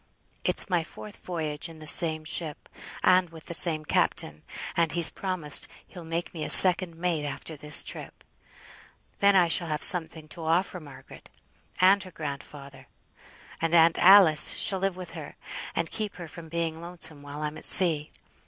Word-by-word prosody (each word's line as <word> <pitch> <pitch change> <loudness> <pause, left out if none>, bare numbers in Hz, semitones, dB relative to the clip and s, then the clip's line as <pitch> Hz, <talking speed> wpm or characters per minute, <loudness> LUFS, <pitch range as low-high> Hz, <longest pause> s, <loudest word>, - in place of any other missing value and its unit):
It's - - -2
my 175 -4 -2
fourth 205 +5 -13
voyage 160 -3 -6
in 165 - -14
the 155 - -13
same 155 0 +4
ship, 155 -1 -6 0.4
and 185 -1 +2
with 160 -1 -15
the - - -8
same 160 -2 +3
captain, 75 - -3 0.3
and 165 -2 -1
he's 170 -2 +2
promised 185 -7 -1 0.2
he'll 175 -3 -14
make 165 +1 -6
me 160 -3 -7
second 180 -2 +8
mate 165 -2 -3
after 145 +2 -8
this 150 0 +3
trip; - - -10 1.0
then 200 0 +2
I 180 -2 +3
shall 170 +1 0
have 150 -1 -4
something 160 -3 0
to 165 - -10
offer 175 +3 -2
Margaret; 145 -4 -16 0.5
and 195 +2 +3
her 185 - -10
grandfather, 140 -4 -10 0.7
and 165 +1 -1
aunt 165 0 +3
Alice, 180 -6 +5
shall 190 - -1
live 195 -1 -3
with 180 -1 -10
her, - - -11 0.4
to - - -1
keep 215 -2 -6
her 175 -2 -10
from 160 +1 -13
being 165 -1 -5
lonesome 165 -4 -4
while 145 +1 -10
I'm 150 +1 -6
at - - 0
sea. 160 -5 +3
165 Hz, 170 wpm, -25 LUFS, 155-180 Hz, 1.0 s, second